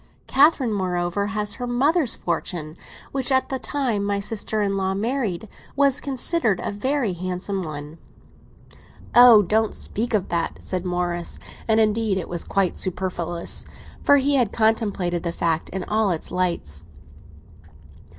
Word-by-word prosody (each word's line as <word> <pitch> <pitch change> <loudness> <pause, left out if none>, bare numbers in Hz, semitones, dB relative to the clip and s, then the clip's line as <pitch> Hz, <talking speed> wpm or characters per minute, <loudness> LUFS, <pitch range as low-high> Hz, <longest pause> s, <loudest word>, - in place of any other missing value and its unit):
Catherine, 270 -4 +4
moreover, 180 0 -1
has 210 -1 -2
her 245 +3 -5
mother's 270 +3 +2
fortune, 165 -2 -3 0.4
which, 270 -1 -1
at 260 0 +3
the 265 - -2
time 250 -9 -1
my 200 0 0
sister 210 +1 -2
in 200 -1 0
law 190 0 0
married, 220 -3 -2 0.3
was 280 0 +3
considered 265 - 0
a - - -2
very 245 0 0
handsome 185 +2 -3
one." 155 -1 -7 1.1
"Oh, 240 -3 +9
don't 220 +3 +1
speak 230 +2 -2
of 200 - -1
that!" 170 -1 -1
said 185 -1 -4
Morris; 175 -1 -2 0.3
and, 220 -1 +3
indeed, 215 -2 +2
it 185 - -4
was 175 -1 -2
quite 195 -3 0
superfluous, 175 -2 -2 0.4
for 285 - +5
he 280 +1 +2
had 245 -6 +2
contemplated 205 -6 +1
the 170 - -2
fact 165 -1 -1
in 190 0 -4
all 215 +1 +1
its 170 -3 -2
lights. 170 - -2
205 Hz, 145 wpm, -23 LUFS, 180-240 Hz, 1.1 s, Oh